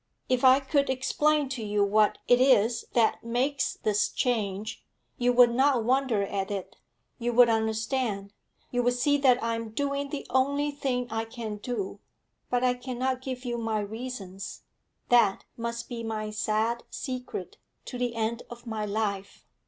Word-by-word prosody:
If 255 0 +1
I 260 +1 +7
could 280 +1 +1
explain 295 +3 +2
to 260 -4 -4
you 205 -1 +1
what 210 +1 +3
it 245 0 +5
is 240 -3 +4
that 230 -2 +2
makes 255 +4 0
this 210 -1 +1
change, 215 -3 -2 0.4
you 245 0 +3
would 245 -1 +6
not 260 -1 +3
wonder 250 -4 +2
at 195 -1 -2
it, 200 -2 -5 0.4
you 240 0 0
would 245 0 +7
understand, 220 -2 -1 0.4
you 245 - +1
would 245 0 +2
see 285 +4 +2
that 255 -3 +4
I 230 0 0
am 230 -1 -4
doing 280 +4 -2
the 285 0 -5
only 280 +3 +2
thing 260 -3 -1
I 225 0 -1
can 225 -2 -6
do. 205 -3 -4 0.5
But 245 0 +1
I 250 -1 +4
cannot 255 +1 -3
give 260 -1 -5
you 240 -1 -2
my 225 -1 -1
reasons; 205 -3 -6 0.5
that 230 -5 +4
must 235 0 -4
be 235 -1 -5
my 215 -1 -3
sad 215 +2 0
secret 255 +9 -5 0.3
to 250 - -6
the 245 -2 -1
end 230 +1 -1
of 240 0 -11
my 220 -2 -3
life. 200 -2 -3
240 Hz, 165 wpm, -28 LUFS, 215-255 Hz, 0.5 s, I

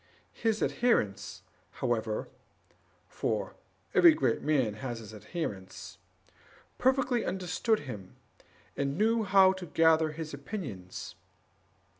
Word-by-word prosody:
His 225 -2 0
adherents, 245 0 0 0.3
however - - -1 0.8
(for - - -2 0.4
every 335 -3 +7
great 315 - +1
man 135 -8 +1
has 120 +2 -5
his 110 -1 -10
adherents), 105 - -6 0.8
perfectly 260 -2 +2
understood 190 +4 0
him, 105 -10 -8 0.6
and 140 +1 -1
knew 225 +2 +3
how 190 -1 +6
to 190 -2 -8
gather 160 0 +4
his 155 -1 -6
opinions. 140 - -6
160 Hz, 100 wpm, -30 LUFS, 130-215 Hz, 0.8 s, every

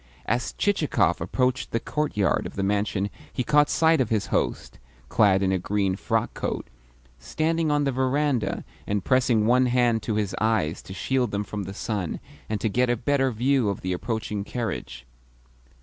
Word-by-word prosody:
As 120 - -1
Chichikov 200 -7 +1
approached 130 0 0
the 115 - 0
courtyard 115 -8 0
of - - -11
the 100 - -1
mansion 100 0 0 0.2
he 125 - -2
caught 150 +3 +4
sight 160 -3 +3
of 120 - 0
his 110 -3 +1
host - - -1 0.3
(clad 100 -3 +4
in 95 - +2
a 95 - +1
green 95 0 0
frock - - -1
coat) - - -4 0.5
standing 160 - 0
on 145 0 +2
the 140 - +1
verandah 130 -1 0 0.2
and 100 -2 -1
pressing 125 -4 +3
one 125 +2 +4
hand 120 -2 +2
to 110 0 -2
his 105 -2 -1
eyes 110 -8 +1
to 95 - -10
shield 125 +5 0
them 100 0 -2
from 105 -1 -5
the 95 - -6
sun 100 -6 -3 0.3
and 105 -1 -1
so 110 - 0
get 125 +4 +1
a 120 - +2
better 135 +3 +1
view 125 0 +1
of 100 - -3
the 95 0 -2
approaching 105 +1 -3
carriage. 100 - -5
110 Hz, 180 wpm, -25 LUFS, 100-130 Hz, 0.5 s, caught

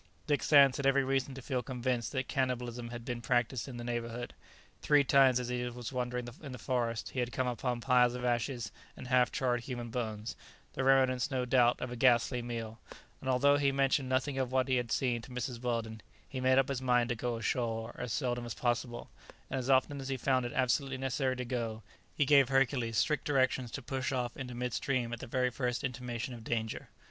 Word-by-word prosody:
Dick 145 -2 +1
Sands 140 -3 +6
had 140 - 0
every 135 0 +4
reason 135 0 -1
to 135 - -9
feel 130 -2 -1
convinced 125 -3 -2
that 130 -2 -2
cannibalism 125 -3 -2
had 120 -1 -7
been 120 -1 -4
practised 120 0 0
in 125 -3 -7
the 120 - -6
neighbourhood, 120 0 -4 0.5
Three 145 -1 +4
times, 135 -2 +5
as 125 -1 -4
he 125 0 -1
was 120 +1 -7
wandering 125 -1 -2
in 140 -4 -7
the - - -6
forest, 115 -2 -2
he 130 - -3
had 120 0 -1
come 130 +2 -1
upon 125 0 -2
piles 125 -1 +4
of 125 0 -4
ashes 120 -2 -1 0.3
and - - -8
half 125 0 +3
charred 125 -3 0
human 120 -2 -6
bones, 110 -2 -4 0.4
the 130 - -2
remnants, 130 -2 +3
no 130 -3 -1
doubt, 125 -1 +4
of 125 - -4
a - - -4
ghastly 120 0 +3
meal, 115 -2 -5 0.4
and 130 - -4
although 140 +3 +4
he 140 -1 +2
mentioned 135 -1 +1
nothing 130 +1 0
of 130 -1 -1
what 130 0 +2
he 130 -1 +2
had 120 -2 -2
seen 120 -3 +1
to 115 - -12
Mrs. 125 -1 -4
Weldon, 115 -3 -2 0.3
he 130 - -5
made 130 0 +4
up 135 +1 +3
his 135 -2 -2
mind 125 -1 +2
to 120 - 0
go 120 +1 -2
ashore 115 0 -2
as 125 -2 -4
seldom 120 -2 -1
as 120 - -5
possible, 120 0 -2 0.4
and 135 - -1
as 130 +1 -4
often 135 +1 +3
as 135 - -6
he 135 - -1
found 130 -1 +1
it - - -8
absolutely 130 +1 +1
necessary 135 0 -1
to 125 0 -4
go, 115 -3 -3 0.3
he 145 - +2
gave 140 -2 +5
Hercules 130 -4 +1
strict 150 -2 +1
directions 130 -3 +1
to 140 - -6
push 130 +2 -2
off 125 -2 -2
into 125 -2 -6
mid 125 0 -3
stream 125 -4 -1
at 120 - -5
the 130 - -7
very 125 +1 +1
first 125 +1 -2
intimation 125 -1 -4
of 115 -2 -9
danger. 110 -1 -3
125 Hz, 220 wpm, -32 LUFS, 120-130 Hz, 0.5 s, Sands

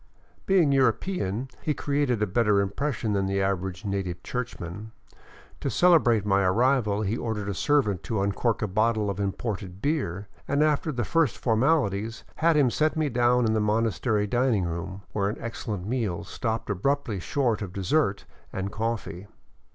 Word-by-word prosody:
Being 175 -7 +4
a - - +3
European, 130 - 0
he 150 - -1
created 140 -6 0
a - - +3
better 105 0 +2
impression 115 +2 -1
than 100 -1 +1
the 100 0 0
average 95 0 -2
native 95 -3 -3
churchman. 110 -4 -5 0.7
To - - -2
celebrate 135 - +4
my 100 -1 +3
arrival 110 +1 +2
he 105 +2 0
ordered 110 -4 -3
a 100 - -1
servant 105 - +1
to 110 -3 -1
uncork 105 +3 0
a - - 0
bottle 110 +1 +1
of 100 - -6
imported 100 -2 -3
beer 105 - -2 0.2
and, 140 +2 +2
after 155 +1 +1
the 120 -5 -2
first 155 - +1
formaHties, 115 -3 +1
had 165 -1 +3
him 135 -5 +4
set 155 +4 +1
me 155 -2 +1
down 120 0 +3
in 110 - +2
the 110 - +2
monastery 110 0 +1
din 120 +3 +2
ing 95 - 0
room, 85 +3 -5
where 100 -1 0
an 105 - -4
excellent 110 -5 -5
meal 110 -7 -2
stopped 110 +3 -3
abruptly 110 +1 -1
short 120 +3 0
of 100 -3 -4
dessert 100 - 0 0.3
and 95 +1 -3
coffee. 110 -4 -3
110 Hz, 165 wpm, -26 LUFS, 100-130 Hz, 0.7 s, Being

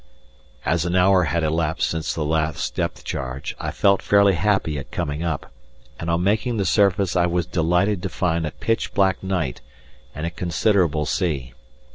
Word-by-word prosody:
] 65 -1 -29
As 85 -1 +1
an 90 +1 -1
hour 90 0 +4
had 85 +1 0
elapsed 80 +1 0
since 80 -2 -2
the 75 - -2
last 80 0 -1
depth - - -3
charge, 65 +1 -4
I - - -3
felt 100 -1 +2
fairly 100 -1 +4
happy 90 -4 0
at 70 - -9
coming 75 +2 -3
up, 85 -4 -3 0.5
and 85 - -4
on 85 +1 +1
making 110 +4 +1
the 100 - 0
surface 100 -2 +2
I 90 -1 +3
was 85 -1 0
delighted 90 +3 +1
to 95 - -3
find 80 +1 -1
a - - -4
pitch 115 0 -2
black 95 -2 +2
night 90 -9 -2 0.5
and 75 +3 -4
a 85 - -2
considerable 85 -2 +1
sea. 70 -10 -2
85 Hz, 180 wpm, -22 LUFS, 80-95 Hz, 0.5 s, hour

